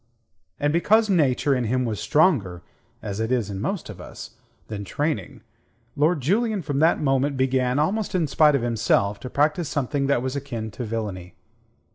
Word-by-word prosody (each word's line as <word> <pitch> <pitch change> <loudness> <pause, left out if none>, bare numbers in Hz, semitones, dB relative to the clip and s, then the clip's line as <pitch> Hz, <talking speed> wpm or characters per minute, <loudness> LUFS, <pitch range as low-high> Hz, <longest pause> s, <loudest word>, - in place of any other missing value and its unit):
And 145 +1 +1
because 215 +5 +3
Nature 145 -5 +2
in 125 -2 -1
him 130 +3 0
was 110 -3 -3
stronger 110 - +2 0.4
as 100 -1 -4
it 110 +2 -1
is 115 -5 0
in 95 0 -5
most 195 - -3
of 95 -4 -9
us - - -10 0.4
than 105 -2 -5
training, 145 - -3 0.5
Lord 150 +2 +2
Julian 205 - 0
from 145 -2 -2
that 160 +2 +3
moment 135 0 +1
began, 130 -1 +1
almost 190 +7 0
in 175 -3 +2
spite 150 +1 +4
of 130 - 0
himself, 105 -3 +1
to 125 - -7
practise 150 +4 +1
something 140 0 -1
that 130 -3 +1
was 130 +1 -3
akin 120 -6 -5
to 120 - -6
villainy. 105 -5 -5
135 Hz, 175 wpm, -24 LUFS, 110-155 Hz, 0.5 s, spite